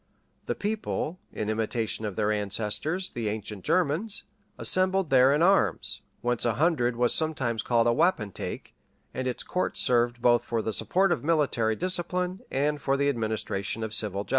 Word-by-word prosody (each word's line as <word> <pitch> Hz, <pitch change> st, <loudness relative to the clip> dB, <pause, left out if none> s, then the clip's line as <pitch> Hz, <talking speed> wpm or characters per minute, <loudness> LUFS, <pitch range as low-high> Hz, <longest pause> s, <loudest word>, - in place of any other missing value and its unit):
The -, -, -1 dB
people, 205 Hz, -5 st, -3 dB
in 105 Hz, -, -4 dB
imitation 110 Hz, 0 st, -1 dB
of 100 Hz, -, -6 dB
their 105 Hz, -1 st, +1 dB
ancestors, 105 Hz, -, -2 dB
the 115 Hz, -3 st, -3 dB
ancient 105 Hz, -2 st, -5 dB
Germans, 185 Hz, +5 st, +2 dB, 0.3 s
assembled 185 Hz, -3 st, +1 dB
there 130 Hz, 0 st, +6 dB
in 150 Hz, +3 st, +3 dB
arms; 195 Hz, +2 st, +2 dB, 0.2 s
whence 120 Hz, -1 st, -1 dB
a 120 Hz, -3 st, +1 dB
hundred 130 Hz, -5 st, +2 dB
was 120 Hz, 0 st, +2 dB
sometimes 135 Hz, -8 st, 0 dB
called 115 Hz, -1 st, +2 dB
a 120 Hz, -, +3 dB
wapentake, 130 Hz, -, -1 dB, 0.4 s
and 130 Hz, 0 st, -3 dB
its 125 Hz, -, -3 dB
courts 180 Hz, -, -2 dB
served 120 Hz, 0 st, +2 dB
both 120 Hz, 0 st, +3 dB
for 115 Hz, -2 st, -2 dB
the 110 Hz, -, -2 dB
support 175 Hz, -, +2 dB
of -, -, 0 dB
military 140 Hz, -9 st, +1 dB
discipline 180 Hz, -, -1 dB
and 145 Hz, +2 st, 0 dB
for 135 Hz, 0 st, +1 dB
the 140 Hz, 0 st, +2 dB
administration 110 Hz, -3 st, -2 dB
of 110 Hz, -1 st, -4 dB
civil 100 Hz, -2 st, -1 dB
justice. -, -, -20 dB
125 Hz, 165 wpm, -27 LUFS, 110-165 Hz, 0.4 s, there